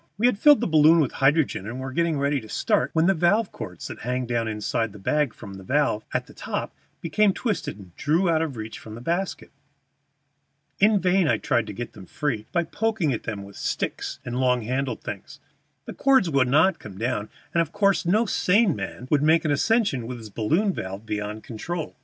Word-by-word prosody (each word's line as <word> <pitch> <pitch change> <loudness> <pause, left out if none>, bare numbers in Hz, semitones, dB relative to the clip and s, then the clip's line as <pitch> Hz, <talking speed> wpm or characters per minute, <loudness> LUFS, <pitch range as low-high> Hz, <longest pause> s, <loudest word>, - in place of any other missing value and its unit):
We 220 - +1
had 245 -5 +3
filled 295 +2 +6
the - - +1
balloon 160 0 +6
with 145 -6 +1
hydrogen, 135 - +1
and 120 +3 -5
were 130 0 -5
just 170 0 +1
ready 140 -1 0
to 110 - -13
start 125 - +1
when 160 0 +3
the 195 - +4
valve 190 +5 +2
cords 90 -4 -7
that - - -8
hang 125 +2 -2
down 120 -1 -1
inside 110 0 -2
the - - -10
bag 145 +7 0
from 100 -3 -11
the 95 0 -10
valve 130 -2 +1
at - - -1
the - - -15
top - - -4 0.3
became 200 +4 +2
twisted 190 - -3
and 95 -4 -14
drew 165 +4 +1
up 170 - +3
out - - 0
of 150 -7 -3
reach 110 0 -6
from 110 -1 -10
the - - -8
basket. 175 +8 -2 1.3
In 210 0 +5
vain 185 -1 +2
I - - +3
tried 120 -2 0
to - - -6
get 120 - -6
them 95 -3 -12
free 130 -6 -3
by 170 - +1
poking 210 -6 -1
at 115 - -5
them 105 -3 -4
with 100 0 -12
sticks - - -3
and 120 +1 -3
long 125 -2 +2
handled 130 +3 -2
things; - - -7 0.5
the - - -7
cords 265 -11 +3
would 135 -3 +3
not 160 +6 +3
come 100 -3 -10
down, 110 -1 -2 0.2
and 170 - +3
of 165 -1 -3
course 200 0 +2
no 210 +7 +2
sane 195 -3 +3
man 125 - -6
would 145 -2 +4
make 160 +2 +3
an 155 - +2
ascension 170 - +1
with 125 0 -5
his 110 -3 -10
balloon 165 - +1
valve 95 - -6
beyond 105 0 -4
control. 155 +8 -5
140 Hz, 220 wpm, -25 LUFS, 115-175 Hz, 1.3 s, filled